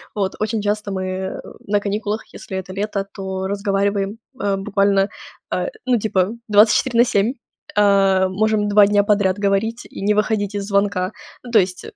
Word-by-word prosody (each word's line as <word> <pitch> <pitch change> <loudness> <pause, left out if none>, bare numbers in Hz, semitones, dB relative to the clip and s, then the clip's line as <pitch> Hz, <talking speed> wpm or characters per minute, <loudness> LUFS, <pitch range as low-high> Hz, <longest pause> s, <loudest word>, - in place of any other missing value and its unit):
Вот, 195 -2 -1
очень 215 0 -1
часто 210 0 -2
мы 190 0 -3 0.3
на 205 0 +2
каникулах, 210 +1 -2
если 190 - -7
это 185 0 -6
лето, 200 0 -2
то 190 -1 -4
разговариваем, 200 +1 -1 0.2
э, 200 -1 0
буквально, 200 0 +2 0.4
э, - - -1 0.2
ну, 250 -2 +3
типа, 195 -3 +1 0.2
24 220 +3 +4
на 240 - +7
7. 215 +3 +1 0.4
Э, 195 -2 +4
можем 210 +1 +1
2 205 0 +6
дня 205 0 +3
подряд 200 -2 +2
говорить 205 +4 0
и - - -9
не 210 +1 +2
выходить 210 -1 0
из 200 -1 -2
звонка. 200 -1 0 0.3
Ну, 240 - -9
то 220 - +6
есть, 180 0 -2
200 Hz, 165 wpm, -20 LUFS, 195-210 Hz, 0.4 s, на